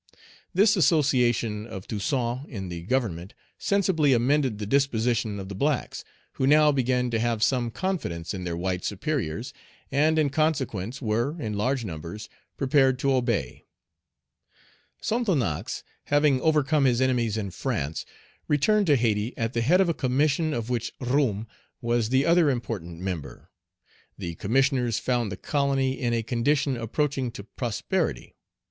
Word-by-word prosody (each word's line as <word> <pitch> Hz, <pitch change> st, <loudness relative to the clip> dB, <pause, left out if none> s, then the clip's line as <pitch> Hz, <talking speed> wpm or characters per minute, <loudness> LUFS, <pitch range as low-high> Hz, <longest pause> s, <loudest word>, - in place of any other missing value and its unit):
This 205 Hz, +3 st, +4 dB
association 125 Hz, -, +2 dB
of 95 Hz, -4 st, -8 dB
Toussaint 125 Hz, +4 st, -2 dB
in 95 Hz, -7 st, -6 dB
the 85 Hz, -1 st, -5 dB
Government 95 Hz, -4 st, -2 dB, 0.2 s
sensibly 180 Hz, -8 st, +2 dB
amended 130 Hz, -1 st, +2 dB
the 105 Hz, -, -4 dB
disposition 115 Hz, -4 st, +1 dB
of 95 Hz, -, -6 dB
the 100 Hz, -, -6 dB
blacks, 140 Hz, +5 st, -1 dB, 0.3 s
who 130 Hz, -, -1 dB
now 150 Hz, +1 st, +6 dB
began 125 Hz, -2 st, +1 dB
to 115 Hz, -, 0 dB
have 115 Hz, -1 st, 0 dB
some 125 Hz, -2 st, +1 dB
confidence 115 Hz, -, -3 dB
in 95 Hz, -2 st, -5 dB
their 85 Hz, -1 st, -3 dB
white 90 Hz, +1 st, -2 dB
superiors, 115 Hz, -, -3 dB, 0.4 s
and 155 Hz, +3 st, +3 dB
in 150 Hz, -3 st, +2 dB
consequence 135 Hz, -, -1 dB
were, 120 Hz, +9 st, -1 dB
in 110 Hz, -6 st, -3 dB
large 125 Hz, +4 st, 0 dB
numbers, 85 Hz, +4 st, -7 dB, 0.3 s
prepared 135 Hz, -1 st, +3 dB
to 135 Hz, +1 st, +1 dB
obey. 115 Hz, -, -1 dB, 1.4 s
Sonthonax, 130 Hz, -, -1 dB, 0.2 s
having 145 Hz, -2 st, +3 dB
overcome 150 Hz, -2 st, +3 dB
his 125 Hz, -2 st, +3 dB
enemies 120 Hz, -4 st, +1 dB
in 100 Hz, -3 st, -3 dB
France, 75 Hz, -2 st, -3 dB, 0.4 s
returned 200 Hz, +8 st, +3 dB
to 145 Hz, -, +5 dB
Hayti, 115 Hz, -1 st, 0 dB
at 115 Hz, +1 st, -2 dB
the 115 Hz, -, 0 dB
head 165 Hz, +11 st, +4 dB
of 190 Hz, -, +3 dB
a 170 Hz, -, +1 dB
commission 145 Hz, +4 st, +1 dB
of 120 Hz, -3 st, -3 dB
which 120 Hz, -1 st, -1 dB
Roume 125 Hz, -5 st, 0 dB, 0.3 s
was 120 Hz, -2 st, 0 dB
the 130 Hz, +2 st, +3 dB
other 170 Hz, -2 st, +4 dB
important 110 Hz, -10 st, -4 dB
member. 85 Hz, -9 st, -6 dB, 0.7 s
The 85 Hz, -, -5 dB
Commissioners 125 Hz, -, +1 dB
found 120 Hz, -2 st, 0 dB
the 95 Hz, -, -5 dB
colony 135 Hz, -2 st, 0 dB
in 120 Hz, -3 st, 0 dB
a 115 Hz, -1 st, 0 dB
condition 135 Hz, +4 st, +1 dB
approaching 130 Hz, +3 st, -1 dB
to 100 Hz, -, -8 dB
prosperity. 115 Hz, 0 st, -3 dB
125 Hz, 145 wpm, -26 LUFS, 110-145 Hz, 1.4 s, now